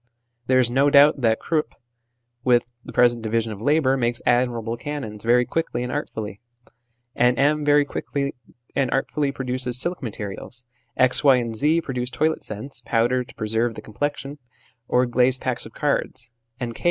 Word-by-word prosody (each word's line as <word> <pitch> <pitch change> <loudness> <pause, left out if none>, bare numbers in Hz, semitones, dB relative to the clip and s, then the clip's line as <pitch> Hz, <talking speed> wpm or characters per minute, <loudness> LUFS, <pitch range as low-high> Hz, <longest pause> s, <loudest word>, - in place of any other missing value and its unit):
There 130 - +4
is 125 -2 +3
no 135 +3 +3
doubt 145 0 +6
that 110 -2 +2
Krupp, 155 -2 -1 0.7
with 120 -2 +3 0.2
the - - -9
present 120 -1 +3
division 110 0 -1
of 105 -1 -8
labour, 145 0 +3
makes 120 -1 0
admirable 120 -2 +1
cannons 120 -5 -6
very 120 +2 +4
quickly 160 -6 -2
and 125 - -4
art 145 - -3
fully; 105 -1 -7 0.7
N. 125 +1 +3
M. 150 +2 +2
very 145 0 +4
quickly 140 0 -3 0.4
and 135 -2 +1
artfully 140 +2 0
produces 125 -2 -2
silk 175 +6 -1
materials; 115 +1 -7 0.3
X. 130 +2 +3
Y. 140 -2 +7
and 120 -2 -2
Z. 155 +8 +2
produce 125 -5 -3
toilet 155 +5 0
scents, 115 +4 -7
powder 120 +3 +1
to - - -16
preserve 115 +2 0
the - - -7
complexion, 145 +5 -4 0.5
or 125 +1 +3
glazed 125 +1 +2
packs 125 -3 -2
of 110 - -17
cards; 130 -4 -2 0.3
and 120 -2 -4
K. - - -12
125 Hz, 170 wpm, -23 LUFS, 120-140 Hz, 0.7 s, Y